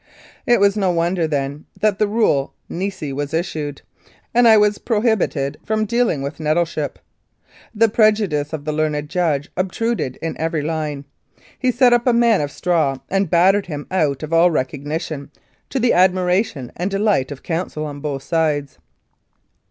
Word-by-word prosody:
It 240 Hz, -2 st, +4 dB
was 200 Hz, 0 st, +4 dB
no 195 Hz, -3 st, +1 dB
wonder, 170 Hz, 0 st, +1 dB
then, 145 Hz, 0 st, -3 dB
that 210 Hz, -2 st, +1 dB
the 215 Hz, -, +3 dB
rule 205 Hz, -11 st, +1 dB
nisi 185 Hz, -6 st, -4 dB
was 145 Hz, +3 st, -3 dB
issued, 155 Hz, -4 st, -3 dB, 0.5 s
and 240 Hz, 0 st, +5 dB
I 220 Hz, -1 st, +7 dB
was 210 Hz, 0 st, +3 dB
prohibited 210 Hz, -, 0 dB
from 215 Hz, 0 st, 0 dB
dealing 230 Hz, -, 0 dB
with 140 Hz, +3 st, -5 dB
Nettleship. 155 Hz, -1 st, -1 dB, 0.8 s
The 225 Hz, +2 st, +4 dB
prejudice 210 Hz, -9 st, +2 dB
of 155 Hz, -3 st, -5 dB
the 155 Hz, -, -1 dB
learned 150 Hz, -1 st, -1 dB
judge 155 Hz, -4 st, -1 dB
obtruded 190 Hz, -, -1 dB
in 165 Hz, -, -4 dB
every 160 Hz, -1 st, -1 dB
line. 150 Hz, -3 st, -3 dB, 0.5 s
He 255 Hz, -1 st, +2 dB
set 245 Hz, 0 st, +4 dB
up 240 Hz, +1 st, +2 dB
a 245 Hz, -, +5 dB
man 235 Hz, -4 st, +4 dB
of 145 Hz, -, -2 dB
straw 155 Hz, -4 st, 0 dB
and 195 Hz, -2 st, +1 dB
battered 190 Hz, +4 st, +3 dB
him 145 Hz, -3 st, -5 dB
out 155 Hz, -6 st, 0 dB
of 155 Hz, +1 st, -5 dB
all 170 Hz, +2 st, +5 dB
recognition, 145 Hz, +1 st, -3 dB, 0.4 s
to 270 Hz, -, -2 dB
the 240 Hz, 0 st, +3 dB
admiration 180 Hz, -, +1 dB
and 180 Hz, +3 st, -2 dB
delight 195 Hz, -9 st, +1 dB
of 140 Hz, -, -8 dB
counsel 165 Hz, -2 st, -3 dB
on 145 Hz, -1 st, -6 dB
both 140 Hz, -2 st, -4 dB
sids. 150 Hz, -3 st, -1 dB
165 Hz, 160 wpm, -20 LUFS, 150-205 Hz, 0.8 s, I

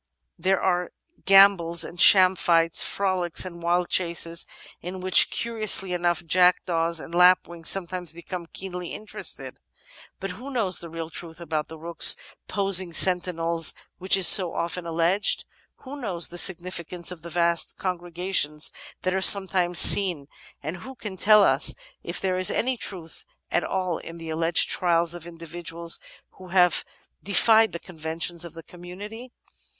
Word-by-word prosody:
There 190 Hz, +2 st, 0 dB
are 180 Hz, -1 st, -2 dB, 0.3 s
gambols 195 Hz, -4 st, +4 dB
and 170 Hz, +2 st, -4 dB
sham 185 Hz, -1 st, +6 dB
fights, 165 Hz, -2 st, +1 dB
frolics 185 Hz, -3 st, -2 dB
and 170 Hz, -2 st, -10 dB
wild 175 Hz, +1 st, -1 dB
chases, 170 Hz, -1 st, -2 dB, 0.3 s
in 180 Hz, +2 st, -8 dB
which, 185 Hz, 0 st, +5 dB
curiously 215 Hz, -5 st, -3 dB
enough, 175 Hz, -1 st, -2 dB
jack* 180 Hz, +1 st, +2 dB
daws 165 Hz, -1 st, -2 dB
and 165 Hz, -, -11 dB
lapwings 175 Hz, -1 st, +2 dB
sometimes 180 Hz, -2 st, -4 dB
become 170 Hz, +1 st, -9 dB
keenly 180 Hz, -1 st, -7 dB
interested. 215 Hz, -, -4 dB, 0.6 s
But 195 Hz, -1 st, -6 dB
who 245 Hz, +9 st, -10 dB
knows 220 Hz, -9 st, -1 dB
the 170 Hz, -, -8 dB
real 165 Hz, 0 st, -8 dB
truth 165 Hz, +1 st, -10 dB
about 155 Hz, -2 st, -5 dB
rooks 160 Hz, +1 st, +4 dB, 0.3 s
posting 190 Hz, -3 st, +2 dB
sentinels, 170 Hz, -3 st, +2 dB, 0.2 s
which 190 Hz, +1 st, +2 dB
is 185 Hz, -3 st, +7 dB
so 180 Hz, -4 st, +6 dB
often 170 Hz, +1 st, -4 dB
alleged? 170 Hz, +5 st, 0 dB, 0.4 s
Who 280 Hz, +2 st, -10 dB
knows 180 Hz, -7 st, -2 dB
the 175 Hz, -, -2 dB
significance 175 Hz, -1 st, -2 dB
of 175 Hz, -3 st, -10 dB
the 170 Hz, -, -10 dB
vast 170 Hz, 0 st, -1 dB
con 185 Hz, -2 st, -4 dB
gregations 175 Hz, -3 st, -2 dB, 0.3 s
that 185 Hz, -, -1 dB
are 190 Hz, -, -2 dB
sometimes 185 Hz, -3 st, +4 dB
seen, 180 Hz, -9 st, +7 dB, 0.4 s
and 155 Hz, +5 st, -6 dB
who 260 Hz, +9 st, -11 dB
can 210 Hz, -5 st, -8 dB
tell 210 Hz, +2 st, +4 dB
us -, -, +2 dB, 0.3 s
if -, -, -5 dB
there 185 Hz, -1 st, -2 dB
is 185 Hz, -, +5 dB
any 255 Hz, +2 st, -1 dB
truth 180 Hz, -6 st, -9 dB, 0.3 s
at -, -, 0 dB
all 185 Hz, -3 st, -3 dB
in 165 Hz, -, -11 dB
the 165 Hz, -1 st, -8 dB
alleged 165 Hz, +1 st, +2 dB
'trials' 170 Hz, -1 st, 0 dB
of 175 Hz, -1 st, -9 dB
individuals 170 Hz, 0 st, -4 dB, 0.4 s
who 185 Hz, -, -12 dB
have 180 Hz, -1 st, +2 dB, 0.4 s
defied 220 Hz, +3 st, +3 dB
the -, -, -6 dB
conventions 165 Hz, 0 st, -5 dB
of 170 Hz, -1 st, -10 dB
the 165 Hz, -, -11 dB
commimity? 200 Hz, +9 st, -11 dB
175 Hz, 155 wpm, -23 LUFS, 170-190 Hz, 0.6 s, is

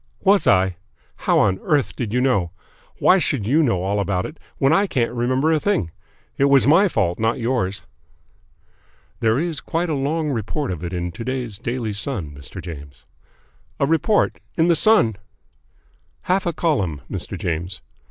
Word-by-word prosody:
"Was 200 Hz, +1 st, +4 dB
I? 95 Hz, -2 st, +3 dB, 0.4 s
How -, -, +1 dB
on 95 Hz, 0 st, +2 dB
earth 145 Hz, -4 st, 0 dB
did 115 Hz, -5 st, -3 dB
you 125 Hz, +2 st, +1 dB
know? 115 Hz, -10 st, +1 dB, 0.5 s
Why 190 Hz, -, +5 dB
should 140 Hz, -, -1 dB
you 145 Hz, +9 st, +3 dB
know 115 Hz, -, +1 dB
all 100 Hz, +2 st, 0 dB
about 95 Hz, -2 st, -1 dB
it 155 Hz, -, -9 dB, 0.2 s
when 135 Hz, +3 st, +3 dB
I 200 Hz, +5 st, +3 dB
can't 120 Hz, -9 st, 0 dB
remember 130 Hz, +6 st, +1 dB
a 155 Hz, -, +2 dB
thing? 180 Hz, -, 0 dB, 0.5 s
It 140 Hz, -, +4 dB
was 140 Hz, -1 st, +5 dB
my 165 Hz, +9 st, +5 dB
fault, 95 Hz, -, 0 dB
not 110 Hz, +1 st, +1 dB
yours." 115 Hz, -6 st, -1 dB, 1.3 s
"There 115 Hz, 0 st, +2 dB
is 160 Hz, -2 st, -2 dB
quite 170 Hz, +1 st, -2 dB
a -, -, 0 dB
long 150 Hz, +2 st, -1 dB
report 130 Hz, +3 st, -2 dB
of 90 Hz, -2 st, -6 dB
it 85 Hz, -, -4 dB
in 90 Hz, -1 st, -3 dB
to 100 Hz, -, -7 dB
day's 125 Hz, -5 st, -4 dB
Daily 115 Hz, -2 st, -3 dB
Sun, 100 Hz, -, -3 dB
Mr. 70 Hz, +5 st, -9 dB
James." 70 Hz, -5 st, -10 dB, 0.7 s
"A -, -, +3 dB
report? 165 Hz, +8 st, +1 dB, 0.2 s
In 165 Hz, +1 st, +3 dB
the 170 Hz, -, +5 dB
Sun?" 160 Hz, -, +4 dB, 1.1 s
"Half 185 Hz, 0 st, 0 dB
a 170 Hz, -, 0 dB
column, 100 Hz, -, -1 dB
Mr. -, -, -5 dB
James. 85 Hz, +3 st, -3 dB
125 Hz, 170 wpm, -21 LUFS, 95-155 Hz, 1.3 s, Why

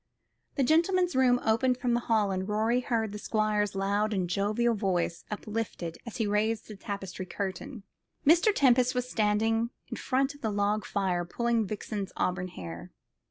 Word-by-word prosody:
The 275 Hz, -, +2 dB
gentleman's 345 Hz, +4 st, +3 dB
room 250 Hz, -1 st, +4 dB
opened 245 Hz, +3 st, +2 dB
from 250 Hz, -2 st, 0 dB
the 240 Hz, -, +3 dB
hall, 220 Hz, -4 st, +1 dB
and 190 Hz, +1 st, -2 dB
Rorie 220 Hz, +4 st, +2 dB
heard 225 Hz, -4 st, -1 dB
the 210 Hz, -, -6 dB
Squire's 210 Hz, -2 st, 0 dB
loud 205 Hz, +2 st, 0 dB
and 185 Hz, -2 st, 0 dB
jovial 210 Hz, +6 st, +1 dB
voice 185 Hz, -5 st, -1 dB
uplifted 210 Hz, -5 st, -4 dB
as 230 Hz, -, -6 dB
he 225 Hz, -, +1 dB
raised 215 Hz, +2 st, 0 dB
the 215 Hz, -, -8 dB
tapestry 195 Hz, -2 st, -6 dB
curtain. 200 Hz, +4 st, -5 dB, 0.4 s
Mr. 340 Hz, +8 st, +6 dB
Tempest 255 Hz, -7 st, +3 dB
was 250 Hz, 0 st, -1 dB
standing 225 Hz, +1 st, +1 dB, 0.2 s
in -, -, -5 dB
front 270 Hz, +2 st, 0 dB
of 285 Hz, -, -17 dB
the 220 Hz, -, 0 dB
log 205 Hz, +1 st, 0 dB
fire, 185 Hz, -3 st, 0 dB
pulling 230 Hz, +4 st, 0 dB
Vixen's 205 Hz, -1 st, -4 dB
auburn 180 Hz, 0 st, 0 dB
hair. 85 Hz, -, -8 dB
215 Hz, 165 wpm, -29 LUFS, 200-240 Hz, 0.4 s, Mr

